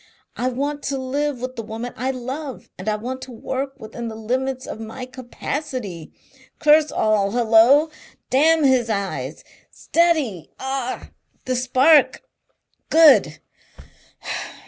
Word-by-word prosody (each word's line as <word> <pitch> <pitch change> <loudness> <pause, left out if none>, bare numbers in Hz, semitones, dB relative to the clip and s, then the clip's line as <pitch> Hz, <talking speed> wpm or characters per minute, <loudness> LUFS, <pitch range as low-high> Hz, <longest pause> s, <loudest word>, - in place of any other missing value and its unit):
I 250 - -1
want 285 +3 -2
to 275 - -1
live 270 0 -2
with 255 0 -5
the 230 - -4
woman 225 +2 -6
I 255 +2 -2
love 265 +2 -6
and - - -4
I 210 - +1
want 255 +5 -5
to 260 - -9
work 265 +3 -5
within 235 +2 -7
the 220 - -6
limits 255 +4 -2
of - - -7
my 225 +3 -7
capacity. 255 - -6 0.5
Curse 305 0 +4
all 215 -2 +2
Hullo! 240 +6 +5 0.4
Damn 315 +4 +4
his 255 -4 +3
eyes! 200 -3 -3 0.3
Steady, 310 - 0
ah! 265 -1 -4 0.3
The 255 - -1
spark!... 260 +5 +4 0.7
Good! 320 -2 +5
255 Hz, 125 wpm, -22 LUFS, 230-280 Hz, 0.7 s, Hullo